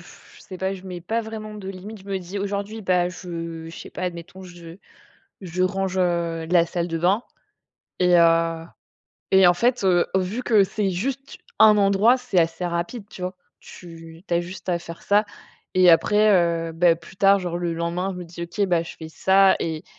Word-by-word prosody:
je - - -17
sais 185 - -10
pas, 190 +1 -2
je 190 -1 -8
mets 180 -2 -7
pas 225 +6 -1
vraiment 220 -1 -7
de 200 -2 -8
limite. 195 +3 -8
Je - - -17
me 195 -1 -2
dis 185 +2 -7
aujourd'hui, 200 +2 -4
ben 180 -3 +1
je 165 -3 -7
je 165 - -10
sais - - -10
pas, - - -7
admettons, 180 +1 -7
je 175 -1 -12 0.6
je 185 -1 -3
range, 190 0 -1
heu, 170 -2 0
la 175 -2 +4
salle 170 0 -2
de 165 -1 -3
bain 190 +7 +2 0.8
et 180 -1 +4
heu 165 -1 +3 0.7
et 190 -1 +6
en 175 - +5
fait, 240 +6 +1
heu, 180 -2 +3
vu 190 +6 -1
que 220 -5 +4
c'est 195 +1 -1
juste 265 +9 -4 0.2
un 210 -1 +7
endroit, 200 +5 +4
c'est 250 -7 -1
assez 165 +1 0
rapide, 175 +6 -4
tu 180 - -11
vois? 185 +1 -3 0.3
Tu 165 -1 -13
tu 175 - 0
as 170 - +2
juste 185 +2 -10
à 175 -1 +1
faire 170 0 -10
ça. 205 +1 +3 0.5
Et 185 -1 +4
après, 210 +5 +5 0.4
heu, 165 - -7
beh, 170 0 +3
plus 170 +3 -16
tard, 195 +1 +5
genre 175 -2 -4
le 175 -1 -2
lendemain, 170 +3 -2
je 180 - -8
me 180 - -6
dis: 170 +1 -8
«OK, 170 +4 -7
ben 170 -2 +1
je - - -9
fais 160 - -9
ça 190 +4 +4
et 160 +1 -4
180 Hz, 205 wpm, -23 LUFS, 170-195 Hz, 0.8 s, un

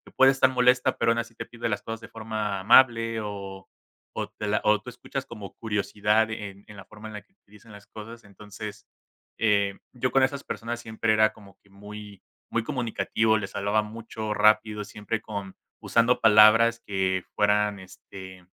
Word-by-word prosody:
puede 135 0 +6
estar 135 -1 +3
molesta, 125 0 +2
pero, 115 0 +2
aún 115 - 0
así 115 -1 -6
te 115 - -6
pide 120 0 -5
las 105 -1 -2
cosas 115 0 -6
de - - -10
forma 110 -3 -4
amable 115 +1 +4
o 100 -2 -7 0.5
o - - -3
te 105 - -7
la 105 - +1
o 105 -1 +3
tú 125 - -9
escuchas 125 +2 -6
como 105 -6 -10
curiosidad 105 0 0
en 100 -2 -7
en 105 - -12
la 100 - -10
forma 110 0 -11
en - - -10
la 105 - -7
que 190 - -35
utilizan 105 - -19
las 100 -1 -13
cosas, 115 +2 -11
entonces, 105 +1 -10 0.5
eh, 100 -3 +1 0.2
yo 125 0 -2
con 135 0 +4
esas 140 +1 -1
personas 120 +1 -5
siempre 110 -1 -1
era 110 0 +4
como 100 -4 -17
que 100 - -26
muy 105 0 -11 0.3
muy 115 - 0
comunicativo, 115 -4 0
les 100 -1 -6
hablaba 100 +2 +1
mucho, 110 0 -6
rápido, 105 0 +3
siempre 105 +1 -5
con 100 -3 -7 0.2
usando 115 +2 +2
palabras 115 +2 +6
que 95 -2 -1
fueran, 105 -1 +2
este, 95 0 -12
110 Hz, 180 wpm, -26 LUFS, 100-115 Hz, 0.5 s, puede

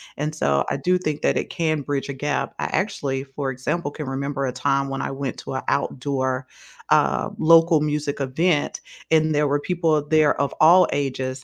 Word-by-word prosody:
and 150 +2 -3
so 70 - +1
I - - -1
do 180 +7 +1
think 155 -5 -3
that - - +2
it - - -2
can 155 -2 -1
bridge 140 0 -3
a 140 - -4
gap. 145 +2 -2
I - - -3
actually, 140 -9 -2
for 135 0 -4
example, 145 +5 -3
can 150 0 -6
remember 140 +1 -2
a 125 - -3
time 135 +1 0
when 135 0 -4
I - - -3
went 135 -1 -4
to 130 - -6
a - - -3
outdoor, 130 -1 -1 0.4
um, - - +2
local 165 0 +5
music 150 -1 -2
event 145 +4 0 0.3
and 155 -1 +3
there 150 0 +2
were 145 +1 +1
people 170 0 0
of 150 0 -4
there 155 -2 +3
of 140 - 0
all 175 +3 +7
ages. 130 -1 -3
145 Hz, 200 wpm, -22 LUFS, 135-155 Hz, 0.4 s, all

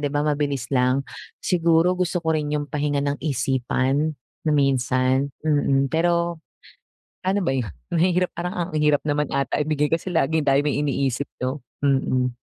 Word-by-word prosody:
di 145 - 0
ba, 145 +1 -1
mabilis 145 -4 0
lang. 130 +1 +2 0.4
Siguro 170 0 +3
gusto 180 -1 -1
ko 160 - +2
rin 150 -2 -1
yung 145 - -2
pahinga 145 -1 0
ng 145 0 -2
isipan 135 +2 0 0.3
na - - +3
minsan, 130 0 +2 0.2
mm, 140 -3 +2
pero 170 0 +1 0.9
ano 195 +2 +1
ba 175 - 0
'yon, 130 -3 0 0.2
mahirap 180 +1 +2
parang 180 +1 -3 0.2
ang - - -11
hirap 150 -1 +3
naman 150 0 0
ata 140 -2 0
ibigay 150 -1 0
kasi 165 +3 -1
laging 160 -1 +1
tayo 140 +1 +4
may 145 -1 0
iniisip 140 -2 0 0.2
no? 130 +3 -1 0.2
Mm. 130 -3 +1
145 Hz, 160 wpm, -23 LUFS, 135-160 Hz, 0.9 s, tayo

